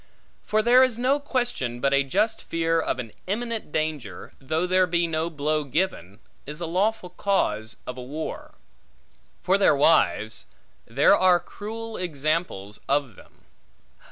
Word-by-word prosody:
For 215 0 0
there 245 +2 +6
is 255 -3 +3
no 260 +4 +2
question, 245 - -2
but 140 +2 +1
a 140 - +4
just 210 +11 0
fear 165 0 0
of - - -2
an 120 -4 -6 0.2
imminent 225 -2 -3
danger, 150 - -3
though 155 +6 -1
there 185 0 +3
be 170 0 +1
no 165 0 -1
blow 155 0 -1
given, 140 - -2 0.3
is 150 +2 -6
a 175 - -2
lawful 185 +2 -1
cause 110 - 0
of 125 0 -6
a - - -5
war. 145 +5 -6 0.9
For 190 +2 +3
their 195 - +5
wives; 140 -7 +2 0.4
there 140 +11 +5
are 185 -2 +4
cruel 225 +4 -7
examples 155 - -2
of 140 -6 0
them. - - -20
165 Hz, 150 wpm, -25 LUFS, 140-200 Hz, 0.9 s, there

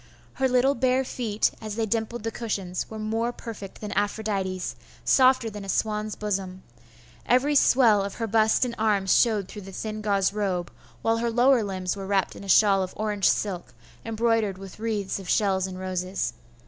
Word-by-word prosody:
Her 265 - +1
little 255 +2 +3
bare 255 +1 +2
feet, 220 -5 0
as 215 -1 -5
they 225 0 0
dimpled 225 +1 -2
the 225 - -2
cushions, 195 -7 -3
were 220 - -7
more 225 +2 -1
perfect 215 -5 -9
than 210 -1 -5
Aphrodite's, 200 -3 -2 0.3
softer 255 -2 +4
than 210 -2 -6
a 195 - -8
swan's 215 +1 -1
bosom. 190 -3 -3 0.6
Every 255 +4 +3
swell 240 -7 +5
of 200 - -5
her 230 - -2
bust 220 +3 +3
and 240 - -4
arms 205 -3 +2
showed 215 -5 +3
through 210 - -9
the 195 0 -10
thin 215 +2 -5
gauze 200 -2 +1
robe, 190 -4 -2 0.3
while 225 0 +2
her 235 +1 0
lower 245 +2 +4
limbs 185 -2 -3
were 195 -1 -6
wrapped 195 -1 0
in - - -10
a 200 - -9
shawl 195 0 +5
of 185 0 -4
orange 210 -2 +1
silk, 180 - -2 0.3
embroidered 225 -3 0
with 195 +1 -11
wreaths 215 -4 -2
of 190 - -9
shells 190 -3 +2
and 185 -1 -7
roses. 185 -9 -2
210 Hz, 185 wpm, -26 LUFS, 195-225 Hz, 0.6 s, swell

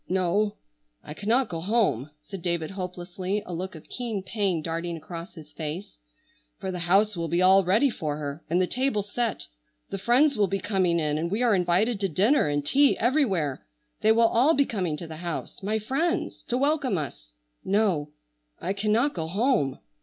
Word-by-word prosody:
"No, 190 +3 +1 0.5
I 150 - -7
cannot 230 +8 +1
go 165 -4 -5
home," 190 - +1
said 180 +5 -9
David 170 -1 -1
hopelessly, 185 +1 -4
a 180 - -6
look 185 +2 -4
of 155 - -12
keen 230 -6 -4
pain 190 -5 -1
darting 165 +1 -3
across 170 +4 -8
his 155 -2 -12
face, 160 - -6 0.6
"for 190 - -4
the 180 - -4
house 195 +5 +3
will 170 -1 -2
be 170 +2 0
all 190 +1 +6
ready 215 +10 +3
for 150 -7 -3
her, 145 +1 -5
and 175 +3 +2
the 185 - +3
table 250 0 0
set. 225 +2 -2 0.5
The 195 - -3
friends 265 +8 +4
will 205 -2 +2
be 195 - -1
coming 185 -4 +1
in, 150 -1 0
and 170 +2 -1
we 210 +6 0
are 235 -3 +4
invited 190 +5 +2
to 195 -1 0
dinner 205 - +3
and 145 -1 -1
tea 280 - +4
everywhere. 205 - +1 0.4
They 215 - +5
will 230 +1 +5
all 260 +9 +4
be 280 +1 +3
coming 180 -10 -2
to 170 - -6
the 160 -1 -8
house, 170 -1 -5
my 210 +3 0
friends, 315 - -1
to 245 - 0
welcome 280 - +1
us. - - -6 0.3
No, 190 -7 +1 0.5
I 190 - -2
cannot 215 +7 +1
go 160 -2 -3
home." 195 - +1
190 Hz, 190 wpm, -26 LUFS, 165-225 Hz, 0.6 s, all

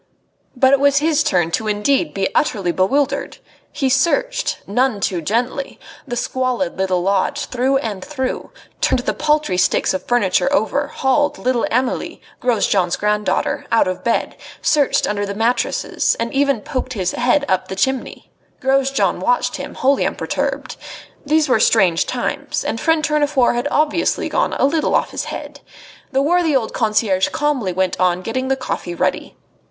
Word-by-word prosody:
But 260 +1 +4
it 275 - +5
was 280 0 +3
his 305 +1 +2
turn 180 - +1
indeed 215 +2 +1
to - - -19
be 195 -1 -1
utterly 195 - +1
bewildered. 260 +11 0 0.3
He 275 -3 -1
searched - - +1
none 245 +1 0
too 180 -3 -1
gently 245 - -2 0.3
the 240 - -3
squalid 255 +2 -1
little 185 -2 0
lodge 200 +9 0
through 260 +2 +1
and 210 -8 -4
through, 265 -4 -4 0.3
turned - - +3
the - - -1
paltry 300 -10 +1
sticks - - +2
of 190 - -2
furniture 240 +2 +2
over, 285 +1 +1
hauled 290 +1 0
little 250 -2 0
Amelie, 255 +2 -1 0.2
Grosjean's 200 -7 +1
granddaughter, 210 -2 -1
out 230 -4 +3
of 185 0 -4
bed, 235 - 0 0.2
searched 290 -3 +2
under 205 0 -2
the 200 0 -4
mattresses, 230 +3 0
and 230 0 -2
even 275 -4 +1
poked 255 -2 -4
his 185 -5 -1
head 255 +4 +1
up 185 - 0
the 190 - -5
chimney. 265 +7 -2 0.3
Grosjean 270 0 +1
watched - - 0
him - - -7
wholly 275 +1 +2
unperturbed. - - -3 0.5
These 310 +1 +2
were 250 -4 +3
strange 190 -7 +3
times, - - -3
and 225 - -2
friend 325 -1 +2
Tournefort 295 -5 +2
had 240 +1 -1
obviously 305 +3 +1
gone - - 0
a - - +2
little 310 +3 +1
off - - +1
his - - -4
head. - - -7 0.5
The 270 0 +1
worthy 335 -1 +2
old 230 -4 0
concierge 215 -4 +1
calmly 290 -10 -1
went 185 0 -1
on 180 0 +1
getting 260 +5 -2
the 270 - +1
coffee 180 -9 -4
ready. - - -2
255 Hz, 160 wpm, -19 LUFS, 205-285 Hz, 0.5 s, it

